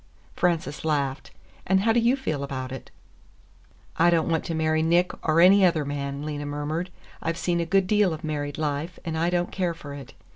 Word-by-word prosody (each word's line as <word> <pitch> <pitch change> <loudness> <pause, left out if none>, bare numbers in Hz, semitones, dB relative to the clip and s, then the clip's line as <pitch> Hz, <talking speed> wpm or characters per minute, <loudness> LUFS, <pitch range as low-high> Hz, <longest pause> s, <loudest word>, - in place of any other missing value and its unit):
Frances 170 -4 0
laughed. 140 -3 -1 0.4
"And 190 +1 +3
how 225 +2 +3
do 235 - +4
you 235 +3 +3
feel 155 - -3
about 130 -2 -5
it?" 135 - -8 1.1
"I 175 - +5
don't 170 -1 +2
want 160 -1 +1
to 165 - -3
marry 160 0 +1
Nick, 175 +3 +3
or 160 +1 +2
any 190 +3 +7
other 165 -5 +3
man," 140 0 -4
Lena 145 -1 -4
murmured. 150 +5 -3 0.3
"I've 165 0 -2
seen 175 -1 0
a 170 - -1
good 195 +2 +3
deal 205 -1 +3
of 155 - -6
married 145 -2 -3
life, 155 +3 -2
and 165 -1 -3
I 165 +2 +1
don't 175 0 0
care 180 -3 -1
for 145 -3 -9
it. 135 -2 -10
160 Hz, 205 wpm, -25 LUFS, 145-175 Hz, 1.1 s, any